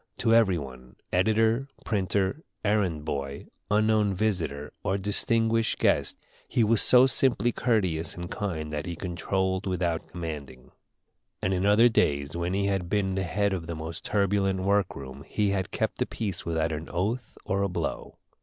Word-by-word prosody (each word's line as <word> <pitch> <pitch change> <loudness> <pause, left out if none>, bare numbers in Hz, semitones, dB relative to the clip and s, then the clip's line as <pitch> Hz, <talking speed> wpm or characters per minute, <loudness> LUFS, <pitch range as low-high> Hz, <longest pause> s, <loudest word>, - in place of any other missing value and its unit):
To 115 -1 +2
every 110 -6 +4
one, 65 -4 -9 0.2
editor, 110 +7 +2 0.2
printer, 100 +4 0 0.2
errand 95 -8 +1
boy, 70 -1 -4 0.2
unknown 105 -1 +2
visitor, 85 -8 -2
or 95 -1 0
distinguished 115 +3 +2
guest, - - +2 0.3
he 120 - +2
was 110 0 +4
so 125 0 +7
simply 130 -2 +2
courteous 95 -11 0
and 85 0 -6
kind 80 -7 -3
that 75 +4 -3
he 85 - -4
controlled 95 +2 -2
without 90 -3 -1
commanding; 75 -7 -7 0.7
and 95 - 0
in 95 +2 +1
other 110 +4 +6
days, 70 -10 +1
when 85 +2 -1
he 100 0 +1
had 95 -3 -1
been 100 -1 0
the 95 - -1
head 100 +3 0
of 85 -3 -4
the 85 - -4
most 80 +1 -6
turbulent 100 -2 +1
work 100 +1 +1
room, 70 +1 -9
he 105 -2 0
had 95 -2 -1
kept - - -2
the - - 0
peace 100 -6 -4
without 80 -1 0
an 80 +1 -5
oath 110 +7 -2
or 100 +1 0
a 100 - +1
blow. 90 - -4
95 Hz, 165 wpm, -27 LUFS, 80-105 Hz, 0.7 s, so